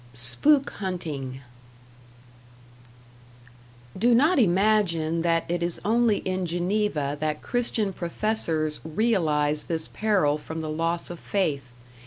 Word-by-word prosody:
#Spook 265 - +2
Hunting# 150 -9 -4 2.5
Do 235 +5 +3
not 300 +6 +4
imagine 180 -5 +2
that 165 0 +1
it 175 0 -2
is 170 0 -1
only 225 0 +3
in 185 -1 -1
Geneva 175 -4 -1
that 155 0 -2
Christian 230 -5 -1
professors 170 -5 -2
realize 155 -5 +1
this 160 -2 -1
peril 185 -9 +1
from 160 +2 -6
the 155 -1 -4
loss 165 +2 -1
of 175 - -8
faith. 145 -10 -1
170 Hz, 110 wpm, -25 LUFS, 155-210 Hz, 2.5 s, not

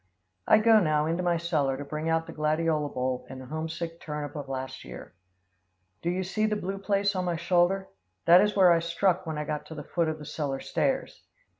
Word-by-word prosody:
I - - +7
go 220 0 +6
now 155 -5 +2
into 165 +3 -1
my 175 -1 +1
cellar 150 -6 0
to 145 - -6
bring 155 +3 -3
out 165 0 +1
the - - -9
gladiola 155 -1 0
bulb 130 -1 -2
and 130 - -8
the 130 - -9
homesick 160 +3 -5
turnip 150 -1 -5
of 145 -2 -6
last 130 0 -5
year. - - -10 0.9
Do 170 - -1
you 185 +2 -1
see 215 +4 0
the 215 - 0
blue 195 -1 -4
place 200 0 +1
on 185 -1 -1
my 175 -1 0
shoulder? 175 +3 +2 0.4
That 175 +2 +8
is 210 0 +1
where 185 -3 +6
I 170 - +5
struck 175 +2 0
when 160 -1 -3
I 150 - -2
got 150 0 -4
to 160 - -8
the 150 - -6
foot 165 +2 0
of 155 - -3
the 150 - -10
cellar 140 -2 -3
stairs. - - -1
165 Hz, 220 wpm, -28 LUFS, 150-180 Hz, 0.9 s, That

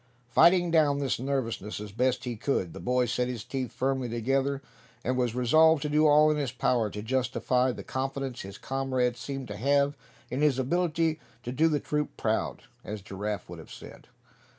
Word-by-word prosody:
Fighting 175 +4 +5
down 150 -4 +4
this 140 -5 -1
nervousness 120 -6 -2
as 105 -1 -7
best 125 +3 0
he 120 -2 -3
could, 105 - -1
the - - -8
boy 125 0 +1
set 125 +1 0
his 120 -4 -4
teeth 125 0 -4
firmly 130 -1 -1
together, 135 +4 0 0.4
and 130 - 0
was 125 -2 0
resolved 155 +5 +4
to 150 - -1
do 155 +1 +4
all 150 +1 +6
in 150 - 0
his 140 -4 -1
power 120 -3 +1
to 105 +1 -6
justify 130 +1 +1
the - - -7
confidence 135 -1 -3
his 95 +1 -8
comrades 130 -2 -1
seemed 135 -2 -5
to 105 - -5
have 140 +4 +2 0.4
in 130 +3 -1
his 150 -4 +3
ability 160 +3 0 0.2
to 120 - -4
"do 155 +6 +3
the 150 -2 +1
troop 150 0 -2
proud," 110 0 -1 0.2
as 105 -1 -6
Giraffe 100 +2 -4
would - - -9
have - - -12
said. - - -12
130 Hz, 190 wpm, -28 LUFS, 120-145 Hz, 0.4 s, all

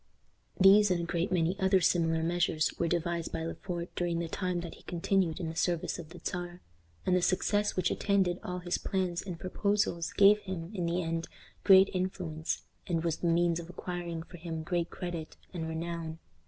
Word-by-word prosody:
These 200 +2 +7
and 180 -2 +1
a - - -2
great 170 +2 -1
many 180 +2 +1
other 190 0 +4
similar 165 -2 +2
measures 170 -2 +1
were 170 - +2
devised 170 0 -1
by 165 - -3
Le 165 - -3
Fort 175 -2 -5
during 175 -1 0
the 170 0 -2
time 180 +1 -2
that 170 - -7
he - - -15
continued 175 -1 0
in 170 - -3
the 160 - -5
service 175 0 0
of 160 -3 -8
the 175 - -11
Czar, 175 0 -4 0.5
and 185 - +3
the 180 - +3
success 205 +3 +1
which 185 -1 +1
attended 190 -3 +1
all 180 0 -3
his 180 0 -2
plans 185 -3 -1
and 180 -4 -6
proposals 200 -2 0
gave 205 +1 +6
him, 185 -3 -6
in 180 -4 -1
the 175 +2 0
end, 165 0 -2 0.4
great 195 0 +7
influence, 180 -4 -2 0.2
and 165 -2 0
was 165 -2 0
the 175 - -1
means 170 0 +3
of 170 0 -8
acquiring 175 -2 -5
for 175 - -12
him 165 -1 -5
great 170 0 -1
credit 175 -3 -6 0.2
and 165 -3 -3
renown. 165 0 -4
175 Hz, 195 wpm, -31 LUFS, 165-185 Hz, 0.5 s, These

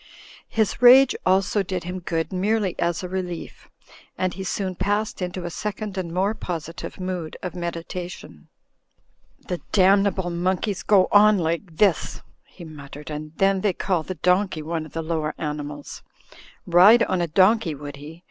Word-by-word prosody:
His 220 +1 0
rage 255 +2 +8
also 190 +2 +2
did 185 -2 -4
him 180 +2 -5
good 165 0 -3
merely 200 0 0
as 170 +1 -1
a - - -3
relief, 180 -2 -6 0.5
and 185 -1 -1
he 190 - -6
soon 190 0 -2
passed 205 +3 -2
into 180 0 -4
a 175 - -4
second 210 +1 -5
and 180 -3 -4
more 190 +4 0
positive 170 -3 -6
mood 185 -3 -4
of 180 - -4
meditation. 175 +1 -7 1.0
"The 180 -3 -3
damnable 195 -2 +3
monkeys 185 +2 -1
go 190 +1 +4
on 210 0 +6
like 170 0 -3
this," 195 -5 +1 0.2
he - - -13
mut 145 -3 -11
tered, 150 +2 -9
"and 150 +1 -6
then 195 -1 +2
they 200 -2 +1
call 175 -2 -1
a 185 - -3
donkey 180 -1 +1
one 160 0 -3
of - - -20
the 165 - -3
Lower 160 -1 -2
Animals. 150 -1 -6 0.6
Ride 190 +7 +7
on 185 -2 0
a 170 - 0
donkey 185 +1 +3
would 145 0 -8
he 155 +4 -11
180 Hz, 165 wpm, -23 LUFS, 165-195 Hz, 1.0 s, rage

